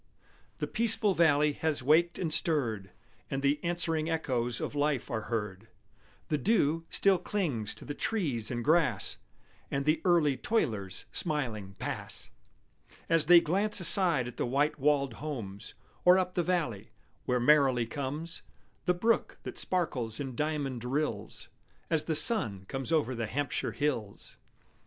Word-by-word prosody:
The - - -2
peaceful 220 -2 +1
valley 150 -3 +4
has 150 -3 -1
waked 160 +5 +3
and 165 -4 -1
stirred, 120 - +1 0.4
And 135 0 -3
the 145 +1 +1
answering 165 -2 0
echoes 125 -7 -1
of - - -4
life 145 -2 0
are 110 -2 -2
heard; 105 -2 -3 0.6
The 150 - +1
dew 165 -6 +2
still 195 -2 +3
clings 155 - -2
to - - -10
the 145 - -4
trees 145 - -1
and 120 -1 -3
grass, 150 - +1 0.5
And 140 0 -2
the 155 +1 +2
early 160 -7 +3
toilers 110 - -1
smiling 115 - -3
pass, - - -5 0.8
As 165 -2 +2
they 175 0 +9
glance 200 +7 +1
aside 170 -8 +3
at 125 - -9
the - - -1
white 145 +4 +1
walled 140 -2 +2
homes, 110 -9 -6 0.3
Or 180 +1 +7
up 185 -1 0
the 180 - +1
valley, 155 - -1 0.4
where 125 0 +1
merrily 130 -2 +4
comes 145 +7 -5 0.4
The 180 - +2
brook 225 +6 +1
that - - -7
sparkles 130 -11 -2
in 135 -3 -4
diamond 145 -4 -2
rills 145 +5 -3 0.4
As 160 -2 +2
the 160 - 0
sun 115 - +1
comes 135 +3 -4
over 150 -6 +2
the 115 -2 -3
Hampshire 140 +3 -2
hills. 115 -9 -3
145 Hz, 145 wpm, -30 LUFS, 120-165 Hz, 0.8 s, they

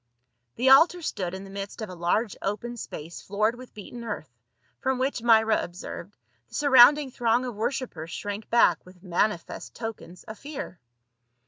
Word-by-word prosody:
The 260 +2 +3
altar 330 +5 +6
stood 190 - -3
in 190 - -7
the 195 - -11
midst 200 +2 -6
of 220 - -4
a - - -7
large 180 +5 0
open 210 +5 -3
space 170 -7 -8
floored 210 +3 0
with 255 +1 -13
beaten 235 +3 -9
earth, 210 - -6 0.5
from 265 0 0
which, 260 -1 -1
Myra 220 -2 +4
observed, 175 +2 -8 0.3
the - - -11
surrounding 285 0 +6
throng 240 +1 +1
of 245 - -4
worshipers 215 - -3
shrank 205 +5 -5
back 205 -8 +4
with 180 0 -17
manifest 180 0 -2
tokens 225 -6 -7
of 220 - -10
fear. 280 - -7
220 Hz, 160 wpm, -26 LUFS, 190-250 Hz, 0.5 s, altar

